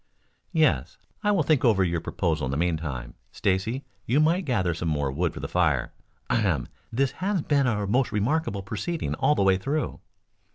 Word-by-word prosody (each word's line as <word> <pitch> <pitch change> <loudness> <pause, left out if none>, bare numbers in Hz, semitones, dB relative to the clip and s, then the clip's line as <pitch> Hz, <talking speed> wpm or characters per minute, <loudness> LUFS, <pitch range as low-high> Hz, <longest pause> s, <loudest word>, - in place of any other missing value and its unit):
"Yes. - - +2 0.3
I 210 - +2
will 190 -6 +3
think 150 -2 +2
over 110 -6 +4
your 85 -2 0
proposal 80 -4 -1
in - - -3
the 70 - -1
meantime. 75 -8 -2 0.2
Stacy, 105 +6 -1 0.2
you 130 +6 +3
might 170 +4 +3
gather 95 - +1
some 85 +1 -4
more 75 -3 0
wood 85 +5 0
for - - -8
the - - -3
fire. 75 -9 +1 0.3
Ahem! - - +1 0.2
This 130 +3 +1
has 195 -4 +1
been 140 -3 +2
a 105 -4 0
most 125 +6 +1
remarkable 105 -1 0
proceeding 165 - -3
all 150 - +2
the 100 - +2
way 95 -1 +4
through." 145 +10 -2
100 Hz, 180 wpm, -26 LUFS, -, 0.3 s, over